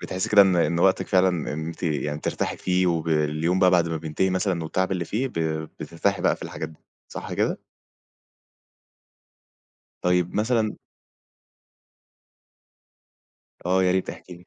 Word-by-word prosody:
بتحسّي 95 0 -3
كده 100 -1 +8
إن 95 -2 +3
إن 85 0 +2
وقتِك 95 0 +3
فعلًا 95 0 +4
إن 80 -2 -3
أنتِ 85 +2 -8
يعني 75 -2 -1
ترتاحي - - -2
فيه 90 0 +1
وباليوم 80 +1 +1
بقى 90 -1 +5
بعد 85 -2 +3
ما 80 - -2
بينتهي 80 +4 -1
مثلًا 95 -2 0
والتعب 95 +4 -1
اللي 90 -2 -1
فيه 125 +9 -2
ب - - -15 0.5
بترتاحي 95 +3 -1
بقى - - +3
في - - -12
الحاجات - - -5
دي، 80 - -16 0.3
صح - - -7
كده؟ - - 0 2.4
طيب 90 -1 +1
مثلًا 110 0 +1 2.9
آه 95 +1 +3
يا 90 - +3
ريت، 95 0 0
احكي 90 - -11
لي. 90 +1 -18
90 Hz, 145 wpm, -24 LUFS, 80-95 Hz, 2.9 s, كده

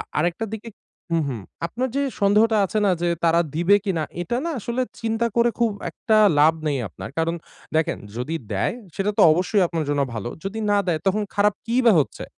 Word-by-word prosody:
আ - - -2 0.2
আরেকটা 175 +7 0
দিক 220 -1 -5 0.5
হু, 165 - +3
হু 130 - -3 0.3
আপনার 250 +9 -3
যে 280 - +2 0.2
সন্দেহটা 215 +2 +4
আছে 205 +3 -1
না - - +4
যে 175 - +2 0.2
তারা 170 0 +4
দিবে 175 +5 +4
কিনা, 180 -6 0 0.2
এটা 235 +7 -2
না 335 - -1
আসলে 235 +4 -2 0.2
চিন্তা 225 0 0
করে 235 0 +4
খুব 235 -2 +2 0.2
একটা 215 +6 0 0.2
লাভ 155 +2 +6
নেই 145 -2 0
আপনার। 85 - -9
কারণ 165 +1 +1 0.4
দেখেন 160 - +1 0.2
যদি 125 +7 -3 0.2
দেয় 100 - 0 0.2
সেটা 195 +1 0
তো - - +7
অবশ্যই 185 +4 +2
আপনার 165 -2 -2
জন্য 145 -1 +1
ভালো 115 +1 -4 0.2
যদি 195 +3 -4
না 205 - +4
দেয়, 165 -3 0
তখন 210 +3 +2
খারাপ 205 0 +3
কি 230 - -2
বা 230 - +8
হচ্ছে? 140 - -4
195 Hz, 205 wpm, -23 LUFS, 160-220 Hz, 0.5 s, বা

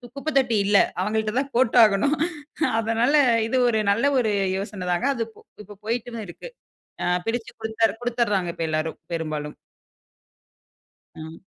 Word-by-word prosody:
குப்பைத்தொட்டி 275 -5 +1
இல்ல 200 0 +4 0.2
அவங்கள்ட்ட 215 +2 -1
தான் 275 0 -3
போட்டாகணும். 235 +2 +4 0.6
அதனால 230 +5 +1 0.3
இது 260 - 0
ஒரு 220 -2 +1
நல்ல 230 +7 +1
ஒரு 220 -3 +1 0.2
யோசனை 195 -2 -5
தாங்க. 175 +10 0
அது 230 - -1
இப் 225 - -19 0.2
இப்போ 205 0 -13
போயிட்டு 235 +1 -3
தான் 220 -2 -5
இருக்கு. - - -9 0.5
அ - - 0 0.2
பிரிச்சு 230 0 -2
கொடுத்தர் 220 -1 0
கொடுத்தர்றாங்க 230 -7 0
இப்ப 165 - -2
எல்லாரும் 155 +1 -2 0.2
பெரும்பாலும். 155 -2 -4 1.6
ம். 160 0 -10
220 Hz, 135 wpm, -24 LUFS, 195-240 Hz, 1.6 s, இல்ல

